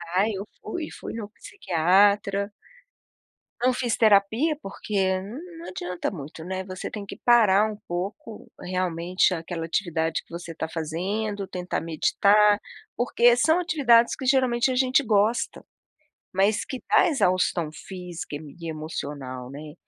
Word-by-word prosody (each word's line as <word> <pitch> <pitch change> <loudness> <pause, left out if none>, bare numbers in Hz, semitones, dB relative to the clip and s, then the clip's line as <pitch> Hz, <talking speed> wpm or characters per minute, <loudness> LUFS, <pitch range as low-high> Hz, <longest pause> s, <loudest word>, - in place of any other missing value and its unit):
Ah, 200 +4 +3
eu 200 -1 -4 0.2
fui, 325 -3 -5
fui - - -8
no 220 -2 -6
psiquiatra 200 +2 +1 1.1
não 255 +1 +3
fiz 245 -2 -1
terapia, 220 +8 +3
porque 195 -1 -1
não 325 - -9
adianta 180 -1 -4
muito, 160 -2 -8
né, 185 +2 -4
você 185 -1 -6
tem 210 -2 -6
que - - -8
parar 215 -3 +4
um 210 - -8
pouco, 195 +5 -6
realmente, 180 0 0
aquela 165 -1 -4
atividade 165 -2 -1
que - - -36
você 170 0 -7
está 160 - -4
fazendo, 195 +6 -3
tentar 180 -1 -3
meditar, 205 +6 +3 0.4
porque 240 0 +4
são 320 +6 +3
atividades 260 -9 +4
que 265 - -7
geralmente 255 -2 +3
a - - -1
gente 260 +2 +3
gosta, 215 0 +1 0.7
mas 200 +3 +2
que 260 -3 -6
dá 420 -2 +5
exaustão 185 - +1
física 175 -1 -8
e - - -5
me 145 -3 -12
e 165 - -5
emocional, 140 -5 -6
né, 150 +2 -9
195 Hz, 140 wpm, -25 LUFS, 170-230 Hz, 1.1 s, dá